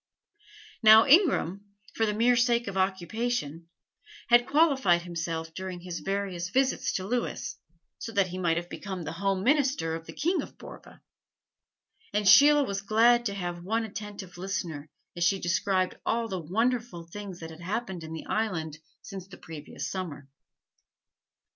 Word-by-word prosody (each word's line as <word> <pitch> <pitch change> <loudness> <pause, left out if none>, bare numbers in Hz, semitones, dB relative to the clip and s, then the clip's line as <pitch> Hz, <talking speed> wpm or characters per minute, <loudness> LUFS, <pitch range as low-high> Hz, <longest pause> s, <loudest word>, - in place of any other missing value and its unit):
Now 220 0 +8
Ingram, 275 - +4 0.3
for 225 - +1
the 210 - 0
mere 240 +3 +4
sake 235 -1 +2
of 200 - -4
occupation, 190 -3 -2 0.6
had 240 0 +5
qualified 270 - +3
himself 165 -2 -4
during 185 -1 -6
his 175 -1 -5
various 195 -3 -3
visits 265 +5 +1
to 185 - -2
Lewis, 240 +4 -3 0.4
so 230 - -6
that 200 -3 +2
he 185 +1 -5
might 170 -2 +1
have 175 0 -3
become 190 -1 -6
the 160 - -5
home 190 +2 -1
minister 265 - +2
of 165 0 -6
the - - -8
King 350 +5 0
of - - -11
Borva; - - -13 1.1
and 210 -1 +1
Sheila 290 +6 +8
was 200 -6 -3
glad 235 +3 +4
to 200 - -4
have 175 -2 -4
one 225 +5 0
attentive 205 -4 -8
listener 170 -6 -4 0.3
as 175 - -1
she 190 +3 +2
described 185 +2 0
all 230 0 0
the 190 -4 -4
wonderful 225 +2 -1
things 190 +1 -8
that 160 0 -8
had 160 +1 -12
happened 190 -2 -4
in 160 - -8
the 160 - -6
island 165 -9 -2 0.2
since 190 -3 -8
the 195 - -12
previous 155 -2 -7
summer. 165 -7 -5
195 Hz, 160 wpm, -28 LUFS, 175-230 Hz, 1.1 s, Now